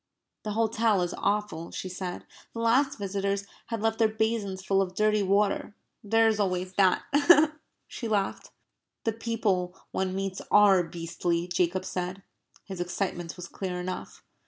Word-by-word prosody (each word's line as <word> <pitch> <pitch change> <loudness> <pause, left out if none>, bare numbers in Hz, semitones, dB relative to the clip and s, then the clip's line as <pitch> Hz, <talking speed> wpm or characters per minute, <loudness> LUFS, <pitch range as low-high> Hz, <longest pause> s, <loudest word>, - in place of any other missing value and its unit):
"The 210 - -4
hotel 220 -3 +2
is 175 - -3
awful," 205 -5 -1
she - - -5
said. 180 -1 -5 0.3
"The - - -4
last 255 +5 +3
visitors 200 0 -2 0.2
had 225 -2 -3
left 225 0 +1
their 225 - +5
basins 215 -3 -1
full 195 0 +3
of 185 -1 -3
dirty 215 +1 +3
water. 200 +1 +1 0.3
There 225 +2 +4
is 220 -1 +1
always 185 -2 -1
that," 190 -1 +3 0.8
she 235 - -5
laughed. 205 -3 -1 0.5
"The 225 - 0
people 205 -6 -1
one 190 0 -1
meets 195 -1 -3
ARE 200 -3 +6
beastly," 170 +1 -2
Jacob 180 +1 0
said. 185 +1 -4 0.4
His 190 -3 -6
excitement 175 -1 -3
was 180 -1 -8
clear 180 0 -4
enough. 185 +1 -6
195 Hz, 150 wpm, -28 LUFS, 180-215 Hz, 0.8 s, ARE